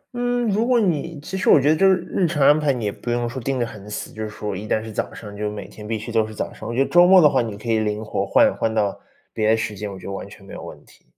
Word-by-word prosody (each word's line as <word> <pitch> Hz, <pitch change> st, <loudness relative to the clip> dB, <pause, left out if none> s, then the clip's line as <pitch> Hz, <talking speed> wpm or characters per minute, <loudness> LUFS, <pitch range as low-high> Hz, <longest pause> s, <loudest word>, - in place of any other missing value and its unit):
嗯， 245 Hz, -1 st, 0 dB
如 220 Hz, +4 st, +1 dB
果 245 Hz, -2 st, +4 dB
你 165 Hz, -5 st, -1 dB
其 190 Hz, +6 st, -7 dB
实 -, -, +1 dB
我 -, -, +8 dB
觉 145 Hz, -, +2 dB
得 155 Hz, -, +5 dB
就 195 Hz, +4 st, +4 dB
是 190 Hz, -, +5 dB
日 180 Hz, -, +1 dB
程 150 Hz, -4 st, +1 dB
安 150 Hz, +2 st, +6 dB
排， 150 Hz, -2 st, +2 dB
你 120 Hz, -5 st, -3 dB
也 100 Hz, -, 0 dB
不 120 Hz, -, -8 dB
用 120 Hz, 0 st, 0 dB
说 125 Hz, +2 st, -6 dB
定 135 Hz, +2 st, -2 dB
得 120 Hz, -, 0 dB
很 105 Hz, -2 st, -10 dB
死， 105 Hz, -, -5 dB
就 110 Hz, -, -7 dB
是 105 Hz, -, -4 dB
说 105 Hz, -1 st, -5 dB
一 105 Hz, +3 st, -6 dB
旦 110 Hz, -, 0 dB
是 110 Hz, -, -8 dB
早 -, -, -3 dB
上， 105 Hz, -2 st, -10 dB
就 105 Hz, 0 st, -2 dB
每 105 Hz, -1 st, -7 dB
天 105 Hz, -1 st, -11 dB
必 110 Hz, 0 st, -1 dB
须 110 Hz, +2 st, -7 dB
都 110 Hz, -1 st, +1 dB
是 110 Hz, -, -10 dB
早 -, -, -4 dB
上， 110 Hz, -, -8 dB
我 120 Hz, -, -3 dB
觉 135 Hz, -, +3 dB
得 -, -, -6 dB
周 175 Hz, 0 st, +7 dB
末 190 Hz, 0 st, +8 dB
的 155 Hz, -, +7 dB
话， 135 Hz, -3 st, +2 dB
你 110 Hz, -3 st, -5 dB
可 110 Hz, +3 st, -11 dB
以 110 Hz, -, +3 dB
灵 105 Hz, 0 st, -2 dB
活 -, -, -2 dB
换 280 Hz, 0 st, +3 dB
换 110 Hz, -, -1 dB
到 105 Hz, -3 st, 0 dB, 0.3 s
别 110 Hz, 0 st, +1 dB
的 110 Hz, -, +4 dB
时 110 Hz, -1 st, -3 dB
间， 100 Hz, 0 st, -5 dB
我 95 Hz, -, -8 dB
觉 -, -, -12 dB
得 100 Hz, -, -5 dB
完 100 Hz, +1 st, -6 dB
全 100 Hz, -1 st, -15 dB
没 -, -, -12 dB
有 -, -, -7 dB
问 -, -, -11 dB
题。 -, -, -22 dB
115 Hz, 370 characters per minute, -22 LUFS, 105-155 Hz, 0.3 s, 我